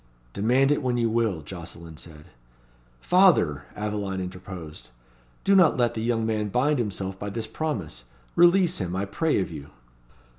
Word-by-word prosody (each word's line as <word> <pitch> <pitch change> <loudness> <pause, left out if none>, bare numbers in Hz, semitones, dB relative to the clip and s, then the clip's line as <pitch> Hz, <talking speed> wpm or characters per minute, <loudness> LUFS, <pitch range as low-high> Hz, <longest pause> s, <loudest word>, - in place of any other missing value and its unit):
"Demand 125 +7 +2
it 145 - +1
when 125 -2 0
you 115 -2 +1
will," 110 -8 0
Jocelyn 85 -1 -9
said. 75 -1 -12 0.8
"Father!" 160 - +4
Aveline 105 -2 -3
interposed, 90 -3 -8 0.5
"do 195 - +4
not 185 -4 +5
let 120 -2 +2
the 110 - -4
young 115 -1 0
man 110 -1 -1
bind 135 +6 +1
himself 95 -3 -3
by 105 - -4
this 110 +2 -4
promise. 105 - -4 0.3
Release 175 0 +4
him, 90 -2 -3
I 95 +2 -1
pray 150 +10 0
of 95 - -2
you." 70 -3 -9
105 Hz, 155 wpm, -25 LUFS, 90-125 Hz, 0.8 s, not